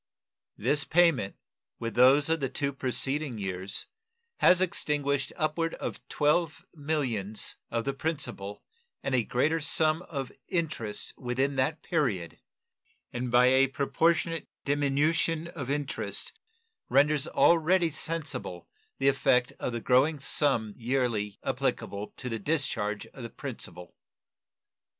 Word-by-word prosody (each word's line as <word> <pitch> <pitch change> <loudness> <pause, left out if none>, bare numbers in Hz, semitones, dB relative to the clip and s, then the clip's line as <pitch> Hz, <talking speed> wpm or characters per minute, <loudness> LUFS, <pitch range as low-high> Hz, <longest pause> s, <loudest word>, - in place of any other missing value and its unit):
This 145 -1 +2
payment, 165 - +3 0.4
with 115 -1 -4
those 130 +5 +6
of 165 0 +1
the 135 -2 -1
two 140 +2 -2
preceding 135 +1 -1
years, 95 -1 -3 0.5
has 180 - +6
extinguished 145 -6 0
upward 160 +2 -1
of - - -5
$12 150 +2 +1
millions 130 - -2
of 115 -1 -2
the 140 - 0
principal 135 -9 -3 0.4
and 135 - -2
a 125 -2 +3
greater 155 +8 +1
sum 155 +1 +2
of 135 -5 -4 0.2
interest 155 - -2
within 135 +3 -1
that 150 +5 0
period, 115 - -1 0.7
and 125 +1 -3
by 120 +1 +5
a 135 +1 +5
proportionate 165 +5 0 0.2
diminution 150 +3 +1
of 140 -7 -6
interest 145 -1 -2 0.6
renders 145 +1 +3
already 170 +1 +4
sensible 150 - -3 0.3
the 135 - +1
effect 125 -2 +3
of - - -2
the 120 -1 -4
growing 135 +6 +3
sum 130 -6 +2
yearly 120 -5 -1
applicable 100 +1 -2
to 125 - -6
the 115 -2 -3
discharge 105 -6 -1
of 135 - -13
the 115 - -6
principal. 90 -4 -6
140 Hz, 120 wpm, -29 LUFS, 120-155 Hz, 0.7 s, those